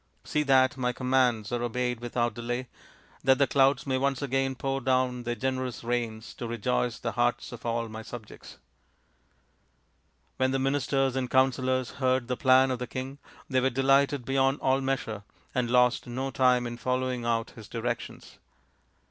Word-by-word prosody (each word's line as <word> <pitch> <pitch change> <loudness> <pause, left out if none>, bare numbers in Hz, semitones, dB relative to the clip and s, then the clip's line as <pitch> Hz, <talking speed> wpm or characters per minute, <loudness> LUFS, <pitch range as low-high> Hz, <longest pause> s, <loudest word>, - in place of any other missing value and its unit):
See 150 - 0
that 135 -2 +3
my 125 -1 0
commands 125 -5 +1
are 120 -1 -1
obeyed 125 0 -1
without 120 0 -1
delay, 120 +1 -4 0.6
that 130 0 +5
the 140 - +4
clouds 135 +1 +3
may 130 -2 0
once 140 0 0
again 135 0 0
pour 135 +1 -2
down 130 -1 +1
their 120 0 -1
generous 130 -2 -3
rains 115 -2 -3
to 120 - -4
rejoice 120 +1 -1
the 115 - -3
hearts 120 0 0
of 120 -1 -7
all 115 0 -1
my 110 0 -7
subjects." 110 -1 -10 1.8
When 130 0 +2
the 135 - 0
ministers 135 -1 +1
and 130 -2 -1
counsellors 130 -1 +2
heard 130 -1 +1
the 125 - 0
plan 130 +1 +4
of 125 - -2
the 125 - -4
king 135 +2 -6 0.3
they 130 -2 +2
were 130 - +3
delighted 135 +1 +2
beyond 135 +1 +2
all 135 +1 +2
measure, 130 -6 -2 0.3
and 125 -3 0
lost 125 +1 +3
no 130 +3 -3
time 125 -2 +3
in 120 0 -5
following 125 0 -1
out 115 -1 -1
his 110 -3 -12
directions. 120 0 -5
130 Hz, 165 wpm, -28 LUFS, 120-135 Hz, 1.8 s, that